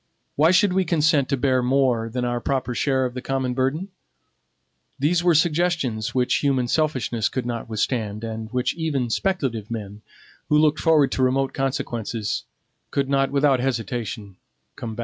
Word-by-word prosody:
Why 155 +3 +4
should 185 +1 +4
we 190 0 +2
consent 155 -5 +2
to 140 - +1
bear 130 -1 +2
more 125 -3 +1
than 125 +2 -2
our 120 0 -1
proper 130 -2 -1
share 130 +1 +1
of 125 - -3
the 125 - -5
common 130 -1 -1
burden? 135 +9 -1 1.1
These 165 +5 +1
were 175 -2 +4
suggestions 155 -9 +1
which 125 -1 +2
human 135 -4 +1
selfishness 130 -7 0
could 130 -2 -3
not 120 -1 -4
withstand, 110 -1 -2
and 110 -1 -5
which 125 0 0
even 145 -8 -2
speculative 130 - -1
men, 105 -2 -6 0.5
who 150 - +4
looked 150 0 +3
forward 155 -4 +3
to - - -1
remote 135 +1 +1
consequences, 120 -5 -2 0.4
could 140 -1 -1
not, 135 -1 +2
without 140 -2 +3
hesitation, 115 -5 -3 0.4
combat. 115 -1 -7
130 Hz, 160 wpm, -23 LUFS, 120-150 Hz, 1.1 s, Why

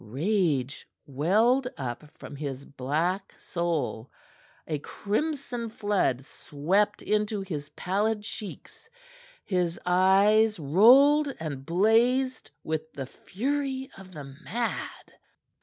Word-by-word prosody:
Rage 145 - -1 0.2
welled 215 - +2
up 125 +2 -5
from - - -9
his 140 -2 -5
black 160 +9 -2
soul; 160 - -2 0.6
a 155 -2 -2
crimson 245 - -3
flood 200 - 0
swept 190 +11 -1
into 210 -1 0
his 155 -6 -5
pallid 210 +3 -1
cheeks; 210 - -8 0.6
his 180 -3 -1
eyes 195 +4 +4
rolled 265 - +6
and 145 -4 -5
blazed 235 +8 +2
with 160 0 -3
the 135 - -5
fury 265 - -3
of 190 -1 -13
the 150 -3 -7
mad. 180 - -5
190 Hz, 100 wpm, -27 LUFS, 150-225 Hz, 0.6 s, rolled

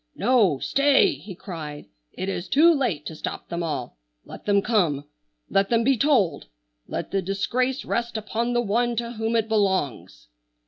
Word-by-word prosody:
"No, 215 - +3
stay!" 275 - +3
he 195 -3 -10
cried. 155 - -7 0.3
"It 185 - -4
is 190 -2 -4
too 330 +4 +6
late 215 - -1
to 160 - -6
stop - - -6
them 170 0 -3
all. 130 - -4 0.3
Let - - -11
them 200 -1 +3
come. 170 -11 +1 0.4
Let 195 0 +1
them 230 -1 +3
be 270 +3 +3
told! 245 - +2 0.4
Let - - -5
the 195 +1 +1
disgrace 240 +8 -1
rest 235 -1 -2
upon 230 +3 -2
the 240 - +2
one 235 +3 +1
to 235 +1 -3
whom 225 0 -2
it 225 -1 +1
belongs!" 190 - -1
210 Hz, 170 wpm, -24 LUFS, 175-240 Hz, 0.4 s, too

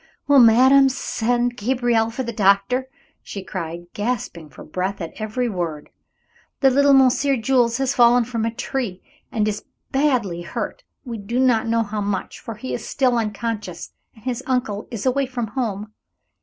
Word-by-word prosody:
"Will 285 -1 +6
madame 260 +4 +7
send 245 -1 -1
Gabriel 240 0 +1
for 245 +3 -4
the 235 -1 -4
doctor?" 200 +5 +2 0.3
she 195 - -7
cried, 170 -3 -6
gasping 205 -8 -3
for 135 - -12
breath 185 +5 -3
at 165 -3 -5
every 220 +3 -1
word. 170 -8 -4 0.7
"The 270 -1 +5
little 280 +1 +5
Monsieur 270 +1 +4
Jules 240 -1 +2
has 270 0 0
fallen 240 0 +5
from 230 -1 -3
a 230 - +1
tree 230 -5 -4 0.3
and 215 -4 0
is 210 -1 -3 0.3
badly 250 - +1
hurt. 175 - -5 0.2
We 235 -3 -5
do 235 +5 -2
not 245 -4 +3
know 230 0 +2
how 210 0 -4
much, 200 -1 -3
for 230 - -7
he 255 +5 -6
is - - -4
still 255 -3 +2
unconscious 210 -5 -3 0.2
and 220 - -19
his 255 -1 -2
uncle 245 -5 -1
is 230 -2 -5
away 265 +1 +1
from 250 -2 -3
home. 215 -3 -3
230 Hz, 170 wpm, -22 LUFS, 205-255 Hz, 0.7 s, madame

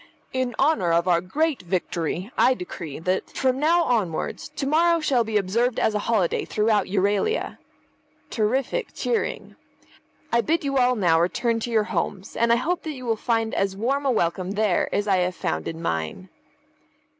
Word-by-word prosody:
In 255 -2 -1
honour 275 - +2
of 170 +2 +2
our 170 -2 +3
great 295 - -1
victory 180 +2 -2
I 260 - +4
decree 175 - -7
that, 185 +4 -1
from 260 -1 0
now 335 +4 +3
onwards, 210 - -1
to - - -2
morrow 335 +4 +3
shall 265 -6 +2
be 220 -1 0
observed 225 +6 0
as 220 - +2
a 210 - 0
holiday 200 -7 +1
throughout 215 0 +1
Euralia 205 - 0 0.7
(terrific 260 - -1
cheering). 460 -2 -2 0.7
I 235 - +3
bid 325 +6 0
you 275 -1 0
all 250 0 +3
now 170 -6 +3
return 230 +6 0
to 235 - -4
your 220 -2 +2
homes, 200 -1 -3
and 235 0 +2
I - - +6
hope 335 +9 -1
that 315 - -5
you 255 -2 -9
will 225 -1 +1
find 225 0 -1
as 195 -1 -1
warm 275 +6 0
a - - +3
welcome 185 -2 0
there 205 -3 +1
as 205 +1 -1
I 195 -2 +3
have 180 0 0
found 80 0 -3
in 165 - -5
mine." 80 - -3
220 Hz, 180 wpm, -24 LUFS, 185-260 Hz, 0.7 s, I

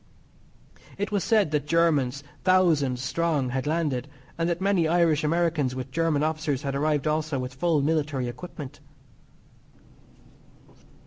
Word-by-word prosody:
It 205 +2 -3
was 205 -2 0
said 215 -8 +2
that 150 -1 -1
Germans, 145 -5 +2 0.2
thousands 160 -9 +3
strong, 150 -2 0
had 130 +2 -2
landed, 150 -5 -1 0.3
and 165 +1 -1
that 170 0 -1
many 190 -4 +2
Irish 165 -2 +3
Americans 155 -4 +1
with 130 0 -6
German 155 0 +1
officers 155 -3 -1
had 140 -1 -2
arrived 145 0 0
also 155 -1 0
with 125 0 -4
full 150 +1 +1
military 145 -4 0
equipment. 145 +2 -8
155 Hz, 130 wpm, -26 LUFS, 135-170 Hz, 0.3 s, thousands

